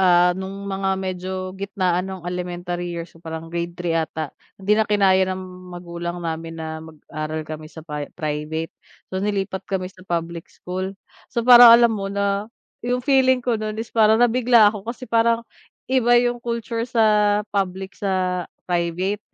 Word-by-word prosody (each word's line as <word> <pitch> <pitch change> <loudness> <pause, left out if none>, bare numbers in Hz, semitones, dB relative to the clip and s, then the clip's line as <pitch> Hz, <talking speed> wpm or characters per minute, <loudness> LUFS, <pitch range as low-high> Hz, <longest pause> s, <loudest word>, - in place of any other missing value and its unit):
ah, 180 -1 +5
no'ng 190 +2 -6
mga 195 0 -2
medyo 185 -1 -4 0.2
gitnaan 190 -2 -1
ng 190 -2 -7
elementary 175 0 -4
years, 170 0 -6
so, 165 - -19
parang 165 0 -7
grade 170 0 -3
3 175 -2 -2
'ata, 160 -2 -2 0.2
hindi 195 +2 0
na 215 0 +3
kinaya 190 -2 +4
ng 185 0 -3 0.3
magulang 175 0 -6
namin 165 0 -4
na 160 0 -5
mag-aral 155 0 -6
kami 155 0 -7
sa 160 -1 -12
pri-private, 150 +1 -4 0.4
so, 190 - -1
nilipat 195 -2 -1
kami 190 -1 -3
sa - - -19
public 170 -1 -3
school. 185 +2 -5 0.4
So 235 -2 -2
parang, 245 -1 +10
alam 235 -1 +4
mo, 195 -2 -3
na, 200 +1 -1 0.3
'yong 245 +1 -2
feeling 260 -3 +3
ko 230 -3 0
no'n, 215 0 -3
is 225 +1 -6
parang 220 -1 +5
nabigla 235 -3 +5
ako 210 +1 -8
kasi 255 +2 -5
parang, 230 0 +2 0.4
iba 240 -2 +4
'yong 240 0 +2
culture 235 -1 -3
sa 210 -3 +3
public, 190 -1 -2
sa 185 -2 -1 0.2
private. 180 +4 -1
190 Hz, 160 wpm, -22 LUFS, 170-215 Hz, 0.4 s, parang